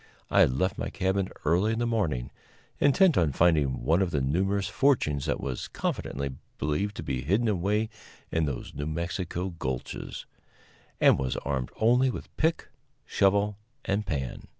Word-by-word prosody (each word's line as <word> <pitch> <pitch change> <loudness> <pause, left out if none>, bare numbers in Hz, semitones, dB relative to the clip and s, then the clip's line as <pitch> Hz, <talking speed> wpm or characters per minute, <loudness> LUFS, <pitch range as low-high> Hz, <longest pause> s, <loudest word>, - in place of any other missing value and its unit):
I - - +4
had 65 - +5
left 95 +5 0
my - - -2
cabin 95 0 0 0.2
early 90 +8 +3
in - - -2
the 120 - 0
morning, 85 - -1 0.5
intent 165 - +5
on 80 -5 +2
finding 75 -6 +2
one 80 +8 +3
of 95 - +1
the 75 - 0
numerous 95 +8 0
fortunes 90 - +1
that - - 0
was 65 -3 -4
confidently 70 +1 -3 0.3
believed 95 +8 -1
to - - -5
be 65 -2 -2
hidden 100 - +1
away 105 +2 +1 0.4
in 80 -1 +1
those 70 -4 -5
New 75 - -4
Mexico 85 +3 -3
gulches, 65 -1 -4 0.7
and - - +5
was 65 -1 -1
armed 65 -3 -1
only 125 +4 +4
with - - -7
pick, 160 +1 0 0.4
shovel 100 +1 +2 0.3
and 100 +1 -1
pan. 65 -6 -3
90 Hz, 160 wpm, -28 LUFS, 70-105 Hz, 0.7 s, had